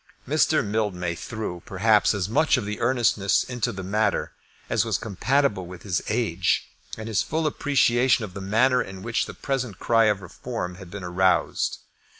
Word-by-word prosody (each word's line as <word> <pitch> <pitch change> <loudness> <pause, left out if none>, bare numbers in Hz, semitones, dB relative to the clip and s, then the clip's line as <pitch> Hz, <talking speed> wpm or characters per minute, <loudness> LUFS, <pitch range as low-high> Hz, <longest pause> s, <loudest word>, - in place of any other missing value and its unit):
Mr. - - +2
Mildmay 100 -5 -1
threw, 90 -1 -5
perhaps, 105 +2 +3
as 95 -2 -1
much 150 +7 +3
of 110 -5 -3
earnestness 110 -2 +2
into 120 -1 -2
the 95 -3 -6
matter 105 +2 0 0.4
as - - +1
was - - 0
compatible 110 -1 0
with 90 0 -10
his 95 -5 -1
age 105 -6 0 0.3
and 110 0 -6
his 110 -3 +1
full 160 0 -2
appreciation 130 -5 +2
of 95 - -11
the 100 - -7
manner 125 +6 +3
in 95 -4 -7
which 115 0 -1
the - - -8
present 125 -7 -3
cry 115 +1 +3
for - - 0
Reform 90 0 -5
had 95 -1 -11
been 100 +1 -7
aroused. 90 +1 +1
105 Hz, 165 wpm, -25 LUFS, 95-120 Hz, 0.4 s, perhaps